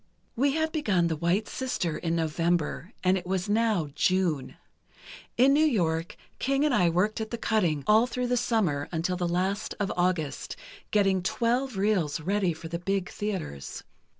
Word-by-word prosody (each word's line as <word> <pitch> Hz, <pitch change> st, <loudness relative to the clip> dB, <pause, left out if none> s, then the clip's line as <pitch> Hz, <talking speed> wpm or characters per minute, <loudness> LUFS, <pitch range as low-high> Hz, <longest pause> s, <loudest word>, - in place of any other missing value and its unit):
"We 275 Hz, +3 st, +2 dB
had 315 Hz, +1 st, 0 dB
begun 205 Hz, -, +1 dB
'The 160 Hz, -, -1 dB
White 175 Hz, +7 st, +1 dB
Sister' 195 Hz, -11 st, -2 dB
in 165 Hz, -1 st, -1 dB
November, 165 Hz, +2 st, -1 dB
and 185 Hz, +1 st, +3 dB
it 180 Hz, -, -12 dB
was 190 Hz, +1 st, -1 dB
now 210 Hz, -7 st, +1 dB
June. 165 Hz, -9 st, 0 dB, 0.8 s
In 265 Hz, +3 st, +6 dB
New 300 Hz, +2 st, +4 dB
York 170 Hz, -, 0 dB, 0.2 s
King 275 Hz, +2 st, +1 dB
and 300 Hz, -, +2 dB
I 180 Hz, -7 st, +4 dB
worked 205 Hz, +7 st, +1 dB
at 220 Hz, -, -4 dB
the 235 Hz, -, -4 dB
cutting, 175 Hz, -11 st, +1 dB
all 220 Hz, +3 st, +5 dB
through 250 Hz, 0 st, -2 dB
the 245 Hz, 0 st, +1 dB
summer, 215 Hz, -12 st, 0 dB
until 175 Hz, +2 st, -1 dB
the 175 Hz, -1 st, -1 dB
last 190 Hz, +4 st, -1 dB
of 200 Hz, -2 st, -1 dB
August, 175 Hz, -5 st, -1 dB, 0.3 s
getting 195 Hz, -3 st, +2 dB
twelve 240 Hz, +5 st, 0 dB
reels 190 Hz, -7 st, +1 dB
ready 190 Hz, +2 st, 0 dB
for 165 Hz, 0 st, -7 dB
the 170 Hz, +1 st, -4 dB
big 195 Hz, 0 st, -2 dB
theatres. 185 Hz, -, -5 dB
190 Hz, 170 wpm, -27 LUFS, 170-225 Hz, 0.8 s, In